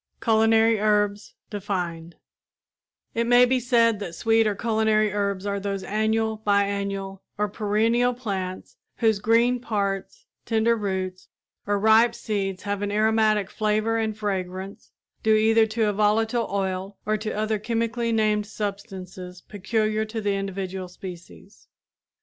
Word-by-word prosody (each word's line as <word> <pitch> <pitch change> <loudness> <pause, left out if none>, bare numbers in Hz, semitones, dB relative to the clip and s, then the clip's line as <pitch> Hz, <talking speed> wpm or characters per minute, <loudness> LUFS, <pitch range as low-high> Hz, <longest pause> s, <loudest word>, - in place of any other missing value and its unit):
CULINARY 225 0 +4
HERBS 205 -1 0 0.2
DEFINED 175 -5 -4 1.0
It 230 0 0
may 245 +1 +7
be 255 +1 +1
said 230 -3 +3
that 175 -5 -6
sweet 225 +1 +3
or 210 - 0
culinary 215 -1 +1
herbs 200 -1 -1
are 200 0 -1
those 195 -1 -3
annual, 220 +1 0
biennial 200 -2 -1 0.2
or 210 0 +1
perennial 225 +4 +1
plants 190 -6 -5 0.2
whose 220 -3 +2
green 235 +4 +3
parts, 210 - -3 0.2
tender 225 +1 +2
roots 190 -3 -3 0.4
or 205 0 +1
ripe 220 +3 +4
seeds 195 -3 -3
have 205 0 -2
an 205 0 -2
aromatic 215 -1 +2
flavor 215 +1 0
and 220 -1 -2
fragrance, 190 -2 -4 0.3
due 220 0 +4
either 220 +1 +4
to 220 0 0
a 210 - +1
volatile 220 +3 +1
oil 190 0 -3
or 215 - +1
to 215 0 -4
other 215 0 0
chemically 230 +1 -1
named 215 -2 +1
substances 190 -4 -6
peculiar 215 +2 -1
to 220 +1 -5
the 205 -2 0
individual 190 -1 -4
species. 180 +2 -12
210 Hz, 135 wpm, -24 LUFS, 195-225 Hz, 1.0 s, may